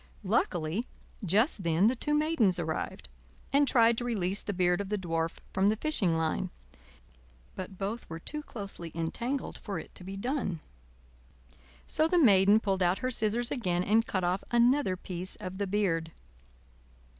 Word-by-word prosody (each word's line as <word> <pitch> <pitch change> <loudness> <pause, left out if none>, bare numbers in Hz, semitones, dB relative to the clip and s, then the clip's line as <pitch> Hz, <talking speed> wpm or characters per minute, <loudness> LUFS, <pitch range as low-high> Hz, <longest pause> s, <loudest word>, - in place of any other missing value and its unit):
Luckily 185 -2 0 0.4
just 205 - +2
then 170 +2 +2
the 240 +4 +4
two 295 +5 0
Maidens 300 - +3
arrived, 160 -2 -3 0.5
and 285 0 +4
tried 230 -2 +4
to - - -4
release 200 -5 -1
the - - -3
beard 180 0 +1
of 200 - -6
the 210 - 0
Dwarf 165 -3 -2 0.2
from 190 +1 +3
the 215 - +2
fishing 210 - +1
line; 160 - -1 1.1
but 185 0 -7
both 205 +5 -4
were 165 - -5
too 300 - -4
closely 200 - -6
entangled 235 +12 -3
for 200 -3 -5
it - - -9
to - - -11
be 195 +2 -6
done. 240 - -2 1.3
So 310 +1 +2
the 355 - +2
Maiden 205 - +6
pulled 195 -3 -1
out 180 +1 +3
her 255 - 0
scissors 230 +1 +2
again 180 -8 0
and 220 +4 +3
cut 185 -2 -1
off 180 +2 0
another 240 -4 +3
piece 180 0 -6
of 185 +1 -7
the 200 - -1
beard. 175 -5 0
195 Hz, 165 wpm, -30 LUFS, 180-235 Hz, 1.3 s, Maiden